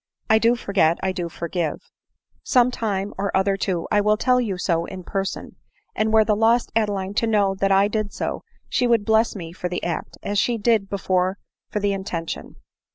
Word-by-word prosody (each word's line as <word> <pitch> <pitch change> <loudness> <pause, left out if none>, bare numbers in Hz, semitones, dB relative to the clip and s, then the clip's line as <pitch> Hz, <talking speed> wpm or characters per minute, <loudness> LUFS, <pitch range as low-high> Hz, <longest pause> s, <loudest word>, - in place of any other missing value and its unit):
I 220 - +6
do 230 +2 +3
forget— 190 -7 +2
I 190 - +1
do 175 -2 -4
forgive; 170 -1 -4 0.5
some 250 -1 +3
time 205 -4 -2
or 200 0 0
other* 195 +1 +2
too, 185 -3 -2
1 205 -1 +3
will 210 +1 +3
tell 250 +2 +3
you 200 -6 -2
so 170 -2 0
in 185 0 -8
person; 195 +1 -4 0.4
and 215 0 +1
were 220 0 +5
the 210 - +2
lost 230 +3 +2
Adeline 200 -3 0
to 230 - +1
know 205 -3 +2
that 195 0 +2
I 195 +1 +5
did 215 -1 -2
so, - - -3 0.3
she 250 - +1
would 230 -3 +2
bless 220 +1 +3
me 170 -4 -7
for 180 0 -4
the 180 - -4
act, 170 -2 -4
as 205 0 0
she 240 +2 +1
did 215 -2 +1
before 185 -1 0 0.3
for 210 - -2
the 205 -1 +1
intention. 180 -4 -5
200 Hz, 200 wpm, -23 LUFS, 185-220 Hz, 0.5 s, I